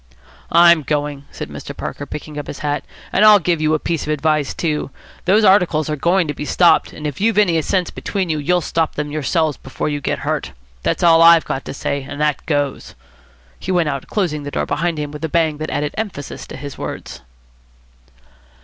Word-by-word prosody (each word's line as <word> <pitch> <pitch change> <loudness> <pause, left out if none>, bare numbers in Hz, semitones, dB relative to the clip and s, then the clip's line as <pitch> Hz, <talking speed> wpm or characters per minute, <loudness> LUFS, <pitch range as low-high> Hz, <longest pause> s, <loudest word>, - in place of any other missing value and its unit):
"I'm 170 -1 +6
going," 145 -1 -2
said - - -7
Mr. - - -8
Parker, - - -5
picking 150 0 -7
up 145 - -7
his 145 - -6
hat. 145 -1 -1 0.3
"And 205 - +4
I'll 215 -1 +9
give 175 -3 0
you 155 0 +2
a - - +2
piece 165 +1 -2
of - - -6
advice, 155 -1 +1
too. 155 -4 -2 0.4
Those 205 +5 +4
articles 170 -6 +3
are - - 0
going 170 +4 +2
to 145 - -2
be 150 - -6
stopped, 165 +2 +3
and 150 - -9
if 145 +3 -4
you've 225 0 +2
any 175 -6 +3
sense 180 +2 0
between 195 -3 -3
you, 155 -2 -1
you'll 175 +5 +1
stop 165 -1 -1
them 150 0 -3
yourselves 155 0 0
before 135 +3 -4
you 145 -1 -3
get - - -1
hurt. - - -2 0.3
That's - - -1
all 165 -1 +6
I've 165 0 +7
got 135 - -4
to - - -5
say, 140 +1 -2
and 145 +2 -8
that 150 -2 0
goes." 145 -3 -2 0.6
He 190 - -4
went 175 -4 +2
out, 140 -2 -4
closing 170 -8 -1
the 145 - -5
door - - -2
behind 165 +3 -1
him 150 -1 -4
with 150 +1 -9
a 160 - -1
bang 160 -2 +1
that 155 - -4
added 145 0 -2
emphasis 200 -11 -5
to - - -8
his 140 -1 -8
words. - - -6
155 Hz, 215 wpm, -19 LUFS, 145-170 Hz, 0.6 s, I'll